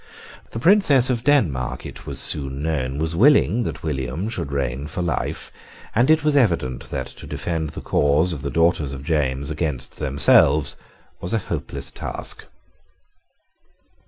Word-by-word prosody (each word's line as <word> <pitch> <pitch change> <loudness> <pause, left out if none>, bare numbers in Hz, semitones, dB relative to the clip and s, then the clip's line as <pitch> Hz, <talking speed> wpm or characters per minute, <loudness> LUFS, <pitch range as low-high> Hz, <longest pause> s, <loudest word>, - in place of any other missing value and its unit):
The - - -7
Princess 140 - +5
of 120 -2 -2
Denmark, 85 - +1
it - - -10
was - - -2
soon 70 -1 +1
known, 70 -4 -2
was 80 +2 -1
willing 120 - +4
that - - -5
William 75 - -3
should 110 -11 -4
reign 70 0 -2
for 80 +3 -3
life; 85 -2 -3 0.4
and 120 +5 +3
it 155 -1 +4
was 150 -1 +2
evident 85 - +1
that 65 - -3
to - - -11
defend 80 -3 -3
the - - -8
cause 75 +5 +2
of 75 - -6
the 70 - -3
daughters 80 -4 +1
of 65 - -9
James 70 -2 -1
against 75 -5 -3
themselves 75 +1 +3 0.4
was 90 - -5
a 110 - -2
hopeless 70 -1 -4
task. - - -4
80 Hz, 155 wpm, -22 LUFS, 70-110 Hz, 0.4 s, Princess